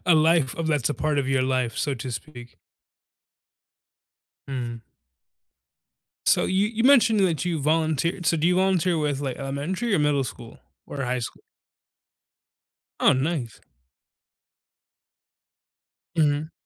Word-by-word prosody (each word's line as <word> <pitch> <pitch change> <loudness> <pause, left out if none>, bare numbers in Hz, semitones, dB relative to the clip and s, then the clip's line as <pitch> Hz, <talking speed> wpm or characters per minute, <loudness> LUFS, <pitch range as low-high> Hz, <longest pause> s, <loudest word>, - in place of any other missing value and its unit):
a 175 - +6
life 160 -3 +3
of 165 - -3
that's 150 -5 +1
a - - -1
part 150 -1 -1
of 140 - 0
your 135 -1 +2
life, 130 -3 -1
so 145 - -1
to 125 +1 -6
speak. 120 -1 -9 1.9
Mm. 120 -3 -5 1.4
So - - +4
you 195 +3 +1
you 225 +1 -2
mentioned 240 -6 +5
that 175 -4 +1
you 175 -3 -1
volunteered 160 +3 0
so, 165 - +3
do 155 - +1
you 180 0 +3
volunteer 185 -2 +2
with, 145 -3 -1
like, 135 -3 -3
elementary 150 +11 -2
or - - +2
middle 145 -2 +2
school 120 -2 -9 0.3
or 140 - -8
high 125 0 -1
school? 120 - -7 1.6
Oh, - - +5
nice. 130 -3 -2 2.6
Mhm. 150 0 +1
150 Hz, 130 wpm, -24 LUFS, 130-170 Hz, 2.6 s, a